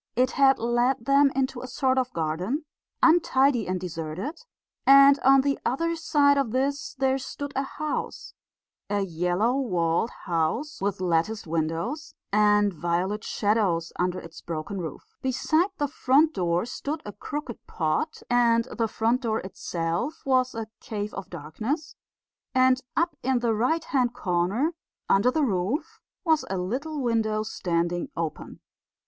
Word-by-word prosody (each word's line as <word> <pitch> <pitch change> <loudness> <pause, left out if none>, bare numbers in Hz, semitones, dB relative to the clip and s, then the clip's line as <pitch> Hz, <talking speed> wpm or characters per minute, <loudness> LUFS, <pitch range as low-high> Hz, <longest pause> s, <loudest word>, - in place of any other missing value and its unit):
It 255 +2 +2
had 270 -1 +4
led 240 +1 +1
them 275 0 +5
into 265 -2 -1
a 255 - -6
sort 260 0 +1
of 255 -1 -2
garden, 175 - -2 0.4
untidy 275 - +4
and 185 0 -1
deserted, 175 - -5 0.4
and 275 +1 +7
on 270 +1 +6
the 280 0 0
other 335 +7 0
side 285 -3 +3
of 270 -4 0
this 275 +6 -1
there 265 0 +1
stood 285 +1 -6
a 270 - +1
house 300 +2 -4 0.6
a 205 0 0
yellow 180 +6 0
walled 180 -6 +1 0.2
house 180 - -1
with 200 -1 -1
latticed 180 +5 0
windows 165 - -3 0.2
and 210 -1 +4
violet 175 +6 -1
shadows 200 -6 0
under 180 0 0
its 165 0 -11
broken 170 +4 -5
roof. 160 - -6 0.2
Beside 310 +7 +1
the 290 - 0
front 285 +4 +3
door 175 +1 0
stood 290 +5 -5
a 205 - -5
crooked 280 +3 -6
pot, 165 - -2
and 235 -1 +3
the 230 -1 +1
front 230 +4 0
door 225 -3 0
itself 175 - -3
was 255 -2 +2
a 225 -1 -3
cave 210 -1 -5
of 195 -1 -7
darkness, 215 - -4 0.6
and 255 0 +4 0.2
up 335 -1 +1
in 265 0 +1
the 235 -2 +1
right 255 +10 +1
hand 250 -6 0
corner, 195 - 0 0.3
under 200 +6 +4
the 305 +4 +1
roof, 210 - -1 0.3
was 320 -2 +3
a 190 - -1
little 265 +12 -3
window 220 -2 +1
standing 175 -4 -1
open. 165 -2 -5
235 Hz, 145 wpm, -26 LUFS, 180-275 Hz, 0.6 s, and